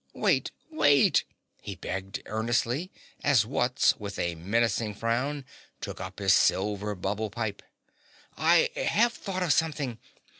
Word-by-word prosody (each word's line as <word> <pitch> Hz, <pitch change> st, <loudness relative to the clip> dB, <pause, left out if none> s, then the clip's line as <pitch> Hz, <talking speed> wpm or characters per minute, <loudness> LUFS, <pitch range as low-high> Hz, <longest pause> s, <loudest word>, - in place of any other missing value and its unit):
"Wait! -, -, +2 dB, 0.2 s
Wait!" 145 Hz, -, +4 dB, 0.4 s
he -, -, -6 dB
begged 95 Hz, +1 st, -5 dB
earnestly 120 Hz, -, -1 dB, 0.3 s
as 130 Hz, -7 st, +4 dB
Wutz 125 Hz, +2 st, +2 dB
with 100 Hz, -2 st, -6 dB
a 85 Hz, -, -1 dB
menacing 105 Hz, +4 st, 0 dB
frown 130 Hz, +6 st, -1 dB, 0.3 s
took -, -, -6 dB
up -, -, -7 dB
his -, -, +3 dB
silver 105 Hz, +1 st, +1 dB
bubble 100 Hz, +4 st, -2 dB
pipe. 105 Hz, -1 st, -4 dB, 0.7 s
"I 165 Hz, +2 st, +4 dB
HAVE 235 Hz, +3 st, +2 dB
thought 185 Hz, -4 st, -4 dB
of 165 Hz, -5 st, +3 dB
something. 145 Hz, -8 st, -1 dB
115 Hz, 125 wpm, -28 LUFS, 105-145 Hz, 0.7 s, Wait